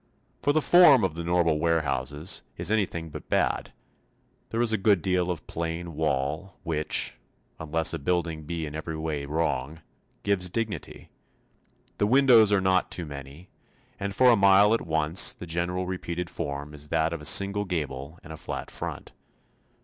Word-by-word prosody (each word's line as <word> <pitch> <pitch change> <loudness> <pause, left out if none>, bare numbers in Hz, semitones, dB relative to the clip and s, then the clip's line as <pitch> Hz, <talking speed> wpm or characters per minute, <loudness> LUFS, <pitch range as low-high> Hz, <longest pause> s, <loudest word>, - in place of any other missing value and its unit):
For 145 - +2
the 155 0 +1
form 155 - +7
of 95 -4 0
the 85 +1 -6
normal 85 -2 +1
warehouse 75 -5 0
is 85 +4 -3
anything 85 -7 -1
but - - -10
bad; - - 0 0.8
there 115 - -3
is 120 -2 +2
a - - +2
good 95 -4 +2
deal 90 -1 0
of 90 -3 -4
plain 85 +1 -5
wall, 75 +4 -2
which 80 -3 -1 0.4
unless 80 +1 +1
a 80 - -3
building 85 0 -2
be 80 0 -4
in 75 - -7
every 80 +1 -5
way 75 -3 -4
wrong 80 0 -2 0.4
gives 90 -3 0
dignity; 110 +1 -5 0.9
the 105 - +2
windows 120 -4 +5
are 100 - +4
not 95 -1 +1
too 90 - -5
many, 70 +4 -10 0.5
and 100 0 -4
for 125 +2 +6
a - - +5
mile 100 +1 +5
at 115 - +1
once 80 +2 +3
the - - -9
general 90 +2 -2
repeated 90 -1 -5
form 75 -2 -5
is 75 0 -7
that 80 +1 0
of 85 - -6
a - - -11
single 100 +2 +4
gable 75 -4 -4
and 80 - -9
a - - -9
flat - - -6
front. - - -6
85 Hz, 170 wpm, -26 LUFS, 80-100 Hz, 0.9 s, form